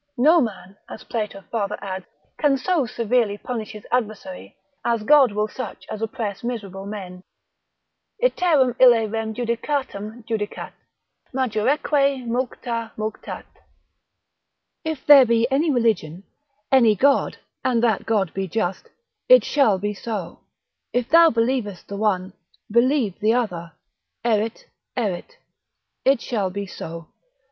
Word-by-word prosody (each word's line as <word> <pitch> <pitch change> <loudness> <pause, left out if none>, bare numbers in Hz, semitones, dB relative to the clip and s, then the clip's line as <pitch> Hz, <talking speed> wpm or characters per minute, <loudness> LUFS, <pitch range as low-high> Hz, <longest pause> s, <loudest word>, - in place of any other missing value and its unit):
—No 310 +7 +5
man 195 -5 -5
(as - - -9
Plato 210 -4 -4
farther 210 -2 -1
adds) 190 -2 -6 0.3
can 290 -3 +3
so 295 -1 0
severely 225 -2 0
punish 225 -1 -5
his 210 -1 -11
adversary, 250 +3 -3 0.3
as 230 -2 0
God 280 -1 +6
will 210 +1 0
such 255 +2 -7
as 215 - -5
oppress 220 -3 -4
miserable 200 -5 -5
men. 185 -3 -7 1.0
Iterum 325 - +3
ille 240 -3 +7
rem 220 0 -3
judicatam 235 -2 -3
judicat, 215 -2 -3 0.6
Majoreque 265 +3 +1
mulcta 235 -1 -3
mulctat. 215 0 -5 1.4
If 315 -4 -4
there 285 -2 +9
be 230 0 +3
any 300 +5 +2
religion, 215 - 0 0.5
any 235 -5 +5
God, 275 +6 +2 0.3
and 240 -2 +1
that 225 -4 +1
God 205 -6 +1
be 195 0 -2
just, 185 0 -2 0.4
it - - +8
shall 250 -9 +3
be 205 +2 -2
so; 205 -3 -5 0.5
if 245 -1 -1
thou 335 +1 +7
believest 230 - -1
the 200 - -5
one, 190 -3 0 0.4
believe 235 -3 +2
the 220 +2 +3
other: 175 -9 -2 0.5
Erit, 225 -1 0 0.3
erit, 230 - -3 0.7
it 270 -3 +3
shall 205 -6 -1
be 200 +2 -4
so. 165 -3 -8
225 Hz, 125 wpm, -23 LUFS, 205-255 Hz, 1.4 s, there